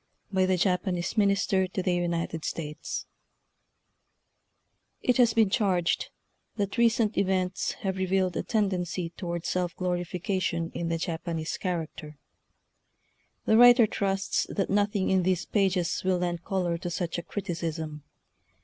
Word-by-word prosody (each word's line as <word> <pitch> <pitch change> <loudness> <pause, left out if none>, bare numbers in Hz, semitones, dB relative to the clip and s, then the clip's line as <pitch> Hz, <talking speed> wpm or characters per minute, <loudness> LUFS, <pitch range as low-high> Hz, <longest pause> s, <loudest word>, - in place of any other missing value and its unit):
BY 190 -1 +2
THE 185 -1 +2
JAPANESE 180 -1 0
MINISTB 175 -6 -1 2.0
IT 250 - +2
has 240 -3 +5
been 220 -3 +4
charged 185 -6 +1 0.5
that 200 -1 -2
recent 230 -2 +3
events 185 -1 0
have 190 -1 -2
revealed 185 -1 +1
a - - 0
tendency 180 -5 -1
toward 170 -2 -5
self 180 -1 -1
glorification 180 -1 -2
in 170 -1 -3
the 165 - 0
Japanese 165 -1 -3
character. 160 -4 -4 1.3
The 220 - +4
writer 245 0 +8
trusts 195 -2 -1
that 195 - -1
nothing 205 -1 +1
in 190 -1 +4
these 180 -1 0
pages 190 -4 +1
will 185 -1 +2
lend 175 -1 -2
color 175 -3 -1
to 175 - -4
such 170 0 -2
a - - -4
criticism. 165 -5 -4
185 Hz, 120 wpm, -28 LUFS, 170-195 Hz, 2.0 s, writer